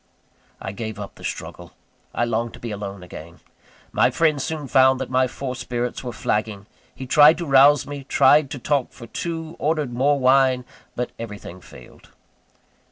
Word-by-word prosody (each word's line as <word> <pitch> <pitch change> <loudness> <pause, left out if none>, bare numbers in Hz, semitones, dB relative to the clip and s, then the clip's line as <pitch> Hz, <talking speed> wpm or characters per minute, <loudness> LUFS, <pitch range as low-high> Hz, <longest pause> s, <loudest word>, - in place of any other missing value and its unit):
I 95 - -5
gave 110 0 -6
up 100 - -7
the - - -16
struggle. - - -7 0.4
I 120 - 0
longed 115 0 -2
to - - -14
be 115 - -6
alone 100 -2 -6
again. 85 -1 -11 0.5
My - - +3
friend 155 -4 +1
soon 155 +1 -4
found 130 0 +4
that 130 -1 -5
my 130 0 +3
forced 130 0 -6
spirits 120 +1 -3
were 125 - -4
flagging; 105 -2 -2 0.3
he 130 - -7
tried 150 +4 +6
to 170 - -4
rouse 140 0 +5
me, 145 -1 -7
tried 140 +1 +4
to 135 - -6
talk 135 +1 -1
for 115 - -11
two, 165 +5 -5
ordered 150 -4 -1
more 140 +4 +2
wine, 130 -1 +3 0.3
but 125 0 -3
everything 105 -5 -8
failed. 60 - -16
130 Hz, 170 wpm, -22 LUFS, 110-145 Hz, 0.5 s, tried